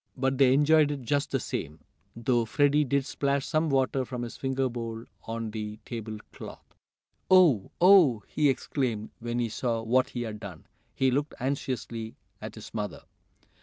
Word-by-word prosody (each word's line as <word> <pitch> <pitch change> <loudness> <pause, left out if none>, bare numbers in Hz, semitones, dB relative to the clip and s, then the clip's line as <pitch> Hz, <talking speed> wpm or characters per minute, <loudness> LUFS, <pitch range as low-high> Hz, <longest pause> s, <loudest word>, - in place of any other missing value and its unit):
But 135 +1 0
they 135 -2 +6
enjoyed 150 +2 +5
it 145 -3 -4
just 140 +3 0
the - - 0
same, 75 +2 -5 0.4
though 120 0 +1
Freddie 145 +5 +3
did 140 +1 0
splash 140 -1 -1
some 155 0 0
water 135 -1 +1
from 125 -1 -5
his 120 - -6
finger 135 0 -1
bowl 115 -1 -5 0.2
on 115 -1 -4
the 105 -1 -5
table 110 -2 -6 0.2
cloth. - - -11 0.6
"Oh! 170 - +5
Oh!" 170 - +6
he 150 -2 +2
exclaimed 125 -5 -2
when 120 0 -3
he 120 -1 +1
saw 115 0 -2
what 125 +3 +2
he 120 - -4
had 110 -2 -6
done. 95 -6 -9 0.3
He 130 -1 +2
looked 145 +3 -1
anxiously 125 -4 -3 0.3
at - - -7
his - - -11
mother. - - -4
130 Hz, 165 wpm, -28 LUFS, 115-140 Hz, 0.6 s, they